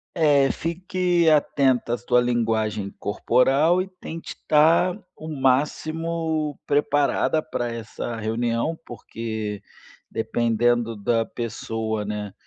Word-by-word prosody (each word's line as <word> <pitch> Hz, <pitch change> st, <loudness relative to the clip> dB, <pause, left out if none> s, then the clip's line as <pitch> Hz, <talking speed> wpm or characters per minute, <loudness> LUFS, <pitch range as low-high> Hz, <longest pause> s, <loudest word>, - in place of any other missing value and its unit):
É, 145 Hz, -4 st, +4 dB
fique 175 Hz, 0 st, 0 dB
atenta 135 Hz, -5 st, +2 dB
à -, -, 0 dB
sua 125 Hz, +1 st, +2 dB
linguagem 110 Hz, -4 st, 0 dB
corporal 135 Hz, -, +2 dB
e 185 Hz, -, -4 dB
tente 175 Hz, -3 st, -8 dB
estar 160 Hz, +4 st, +3 dB, 0.2 s
o 155 Hz, -, -8 dB
máximo 155 Hz, +3 st, 0 dB
preparada 145 Hz, +1 st, +2 dB
pra 120 Hz, -6 st, -3 dB
essa 115 Hz, 0 st, -5 dB
reunião. 115 Hz, +7 st, -1 dB
Porque 110 Hz, -3 st, -5 dB, 0.5 s
dependendo 115 Hz, 0 st, 0 dB
da 115 Hz, +3 st, +1 dB
pessoa, 110 Hz, -2 st, -3 dB
né, 105 Hz, -1 st, -5 dB
125 Hz, 100 wpm, -24 LUFS, 115-155 Hz, 0.5 s, É